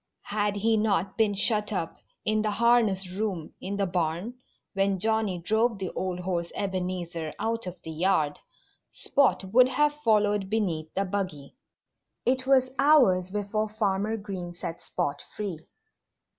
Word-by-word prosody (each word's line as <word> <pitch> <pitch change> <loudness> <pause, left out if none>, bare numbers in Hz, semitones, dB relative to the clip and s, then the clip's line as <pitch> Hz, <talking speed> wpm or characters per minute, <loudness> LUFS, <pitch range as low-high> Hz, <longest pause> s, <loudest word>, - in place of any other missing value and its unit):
Had 205 -1 +1
he 220 +2 +2
not 200 -3 +1
been 215 -3 +2
shut 210 +1 +1
up 170 -5 -3 0.3
in 215 0 +2
the 215 - 0
harness 220 -3 +3
room 190 -5 -3
in 200 +2 -3
the 200 - +1
barn 175 +4 -1 0.4
when 195 -1 +1
Johnnie 220 -1 +1
drove 220 +6 +1
the 190 -2 -4
old 180 -1 -3
horse 175 -2 -2
Ebenezer 180 -4 -3
out 230 -2 -2
of 180 0 -7
the 160 - -6
yard 160 -3 +1 0.5
Spot 275 -7 +2
would 255 +1 +7
have 295 +3 +2
followed 210 -3 +2
beneath 175 -8 -1
the 195 - +1
buggy. 185 - -4 0.7
It 260 +1 +1
was 260 -1 +4
hours 250 -12 +5
before 210 +2 -2
Farmer 210 +1 0
Green 190 -4 -6
set 170 -1 -6
Spot 145 0 -3
free. 195 -7 -4
200 Hz, 145 wpm, -27 LUFS, 180-220 Hz, 0.7 s, would